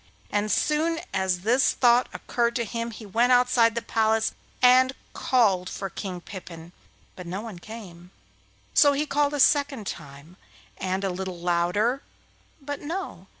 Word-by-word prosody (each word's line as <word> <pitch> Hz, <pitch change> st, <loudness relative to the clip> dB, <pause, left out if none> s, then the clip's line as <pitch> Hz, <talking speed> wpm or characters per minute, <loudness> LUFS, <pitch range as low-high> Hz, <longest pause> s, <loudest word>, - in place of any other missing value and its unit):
As 205 Hz, +1 st, 0 dB
soon 320 Hz, +2 st, +1 dB
as 190 Hz, -2 st, 0 dB
this 240 Hz, +7 st, +3 dB
thought 245 Hz, 0 st, +4 dB
occurred 235 Hz, -1 st, -1 dB
to 235 Hz, -, 0 dB
him 230 Hz, +2 st, -4 dB
he 225 Hz, -1 st, -10 dB
went 235 Hz, +5 st, +2 dB
outside 245 Hz, -2 st, +4 dB
the 235 Hz, -, -2 dB
palace 220 Hz, -1 st, +1 dB, 0.3 s
and 255 Hz, +1 st, +5 dB, 0.2 s
called 195 Hz, -8 st, +2 dB
for 195 Hz, -2 st, -5 dB
King 185 Hz, -2 st, -6 dB
Pippin, 175 Hz, -4 st, -10 dB, 0.4 s
but 180 Hz, -1 st, -9 dB
no 185 Hz, +4 st, -4 dB
one 215 Hz, -6 st, -8 dB
came. 180 Hz, -5 st, -11 dB, 0.6 s
So 285 Hz, -2 st, +6 dB
he 290 Hz, +2 st, 0 dB
called 290 Hz, 0 st, +1 dB
a -, -, -3 dB
second 275 Hz, -5 st, +3 dB
time, 150 Hz, +1 st, -9 dB, 0.4 s
and 190 Hz, +1 st, -2 dB
a 195 Hz, -, 0 dB
little 185 Hz, 0 st, -5 dB
louder, 180 Hz, +9 st, 0 dB, 0.6 s
but 285 Hz, 0 st, -6 dB
no! 305 Hz, -, -6 dB
220 Hz, 150 wpm, -25 LUFS, 185-255 Hz, 0.6 s, So